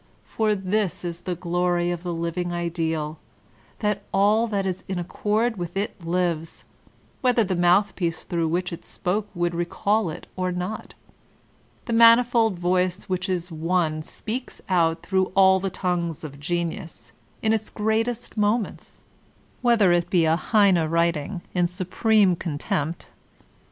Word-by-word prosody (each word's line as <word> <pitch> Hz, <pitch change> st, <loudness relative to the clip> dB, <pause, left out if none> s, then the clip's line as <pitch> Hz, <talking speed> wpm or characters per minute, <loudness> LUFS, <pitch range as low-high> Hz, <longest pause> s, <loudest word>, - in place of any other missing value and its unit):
For 215 Hz, -1 st, 0 dB
this 190 Hz, -2 st, -1 dB
is 170 Hz, -1 st, -4 dB
the 180 Hz, 0 st, -4 dB
glory 175 Hz, 0 st, 0 dB
of 175 Hz, -1 st, -4 dB
the 175 Hz, -1 st, -4 dB
living 170 Hz, +1 st, -2 dB
ideal, 165 Hz, -3 st, -2 dB, 0.6 s
that 210 Hz, -1 st, 0 dB
all 210 Hz, +4 st, +3 dB
that 200 Hz, -3 st, -1 dB
is 185 Hz, -1 st, -3 dB
in 190 Hz, -, -3 dB
accord 210 Hz, +6 st, 0 dB
with 175 Hz, +1 st, -5 dB
it 195 Hz, -3 st, -3 dB
lives, 170 Hz, -2 st, -2 dB, 0.6 s
whether 250 Hz, -3 st, +3 dB
the 185 Hz, -2 st, -1 dB
mouthpiece 175 Hz, -1 st, +2 dB
through 170 Hz, -2 st, -1 dB
which 175 Hz, +2 st, -1 dB
it 170 Hz, -, -8 dB
spoke 200 Hz, +3 st, -2 dB
would 175 Hz, 0 st, 0 dB
recall 180 Hz, +4 st, 0 dB
it 155 Hz, -, -7 dB
or 185 Hz, 0 st, -1 dB
not. 180 Hz, +4 st, -5 dB, 0.9 s
The 235 Hz, -, -2 dB
manifold 230 Hz, -2 st, +5 dB
voice 180 Hz, +2 st, 0 dB
which 185 Hz, -1 st, -3 dB
is 180 Hz, -1 st, -2 dB
one 160 Hz, -1 st, 0 dB
speaks 235 Hz, +10 st, -5 dB
out 165 Hz, -3 st, +2 dB
through 190 Hz, -1 st, +1 dB
all 190 Hz, -1 st, +6 dB
the 195 Hz, +1 st, -2 dB
tongues 175 Hz, -4 st, -2 dB
of 140 Hz, -2 st, -8 dB
genius 160 Hz, -, -4 dB, 0.3 s
in 220 Hz, 0 st, +3 dB
its 220 Hz, -1 st, -1 dB
greatest 220 Hz, +3 st, -1 dB
moments, 210 Hz, +1 st, -1 dB, 0.6 s
whether 230 Hz, -7 st, +4 dB
it 175 Hz, -1 st, +2 dB
be 175 Hz, -3 st, +3 dB
a 160 Hz, 0 st, +3 dB
Heine 195 Hz, -2 st, +3 dB
writing, 170 Hz, +1 st, 0 dB
in 175 Hz, -1 st, +2 dB
supreme 185 Hz, +2 st, +2 dB
contempt. 160 Hz, -1 st, -3 dB
180 Hz, 145 wpm, -24 LUFS, 170-205 Hz, 0.9 s, all